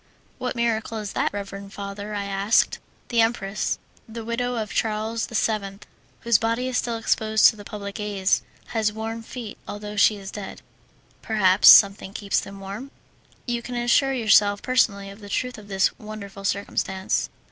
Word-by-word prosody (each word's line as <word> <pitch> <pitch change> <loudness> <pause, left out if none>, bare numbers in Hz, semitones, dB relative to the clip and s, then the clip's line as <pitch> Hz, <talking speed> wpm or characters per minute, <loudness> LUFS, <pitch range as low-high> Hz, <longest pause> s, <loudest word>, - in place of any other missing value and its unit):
"What 250 0 -3
miracle 230 -1 -1
is 210 -2 -5
that, - - 0
reverend 200 0 -7
father?" 200 +1 -6
I 200 -1 -2 0.2
said. 230 - +4 0.3
"The 235 -1 +3
empress, 215 -3 0 0.3
the 225 0 -7
widow 245 +2 -1
of 220 -2 -3
Charles 220 +1 -1
VII, 210 -3 -1 0.4
whose 235 -2 +3
body 230 +3 0
is 255 - 0
still 235 -1 -2
exposed 220 -1 +2
to - - -5
the 205 - -11
public 200 -1 -7
gaze, 200 -2 0 0.3
has 220 -2 +1
warm 225 +1 -5
feet, 225 -2 -8
although 210 0 -6
she 210 +1 +5
is 195 -1 -8
dead." 205 -2 -8 0.6
"Perhaps 200 -3 +5
something 200 -1 +7
keeps 200 -1 0
them 195 0 -9
warm." 200 +8 -7 0.6
"You 240 -1 -2
can 245 +1 -6
assure 240 +3 +3
yourself 210 -4 +4
personally 200 -6 +1
of 200 - -13
the 205 -1 -11
truth 250 +2 -2
of 205 - -14
this 195 -1 +1
wonderful 200 -2 -8
circumstance." 190 -1 -1
215 Hz, 165 wpm, -24 LUFS, 200-230 Hz, 0.6 s, something